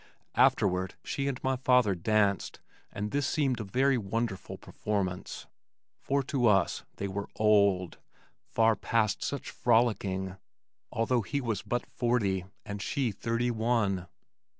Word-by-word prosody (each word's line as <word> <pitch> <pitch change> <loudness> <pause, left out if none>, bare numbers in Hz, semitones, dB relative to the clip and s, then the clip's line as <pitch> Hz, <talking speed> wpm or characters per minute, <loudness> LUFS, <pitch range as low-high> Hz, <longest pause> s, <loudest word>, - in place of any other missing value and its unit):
Afterward 95 -2 +2
she 140 0 -2
and 135 -2 -2
my 130 0 +1
father 125 -5 +3
danced 100 +2 +1 0.3
and 105 +1 -4
this 140 -1 0
seemed 135 -6 +1
a - - -2
very 130 +6 +2
wonderful 110 -1 -3
performance, 95 -4 -3 0.5
for 140 0 0
to 130 -3 +1
us 95 -6 +2
they 100 - -3
were 100 +1 -4
"old" 100 -4 +3 0.5
far 115 0 +3
past 110 -3 0
such 140 - -4
frolicking, 100 -5 +1 0.5
although 115 +2 +1
he 140 +8 -2
was 115 -7 -2
but 120 0 -2
forty 100 -7 0 0.2
and 105 -1 -5
she 135 -1 0
thirty 115 +4 -1
one! 110 -5 0
110 Hz, 130 wpm, -29 LUFS, 100-125 Hz, 0.5 s, father